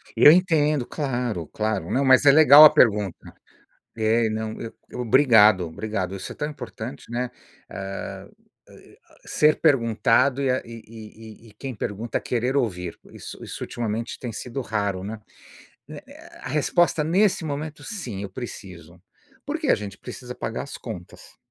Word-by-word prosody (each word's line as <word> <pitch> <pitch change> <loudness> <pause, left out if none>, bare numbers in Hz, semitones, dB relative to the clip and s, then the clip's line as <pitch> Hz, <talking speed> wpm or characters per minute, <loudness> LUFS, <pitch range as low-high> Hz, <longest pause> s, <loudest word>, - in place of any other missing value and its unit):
Eu 150 - +8
entendo, 155 -6 +2
claro, 120 - -3
claro. 105 -4 -3
Não, 135 - +1
mas 130 +2 +5
é 140 - +9
legal 150 0 +9
a - - +10
pergunta. 105 -6 +1 0.6
É, 110 +1 +2
não, 110 0 -4
eu 115 - -7 0.3
Obrigado, 110 -6 +5
obrigado. 95 +2 -4
Isso 95 - -7
é - - -9
tão 150 - -3
importante, 125 -2 -8
né? 125 +1 -2 0.4
Eh, 95 0 -7 0.4
ai, - - -18
ah, - - -23
ser 150 0 +2
perguntado 130 -1 +2
e 135 - 0
a 130 - 0
e 115 -1 -10
e 110 0 -13
e - - -15
e - - -20
quem 130 +4 -7
pergunta 105 +3 -4
querer 125 +2 -2
ouvir. 90 -9 -2
Isso - - -10
isso - - -7
ultimamente 115 0 -4
tem 120 - -5
sido 125 +4 -5
raro, 100 -5 -2
né? 105 +2 -6 0.7
Né 150 -1 -9
né, 280 - -15 0.3
a - - -7
resposta 160 +2 +1
nesse 180 +2 +2
momento 150 0 -5
sim, 125 - -6
eu 100 - -6
preciso. 90 -6 -10 0.4
Por 290 +3 -3
que 310 - -3
a - - +5
gente 100 -1 -8
precisa 125 -1 -9
pagar - - -4
as - - -8
contas. - - -10
115 Hz, 165 wpm, -24 LUFS, 105-140 Hz, 0.7 s, a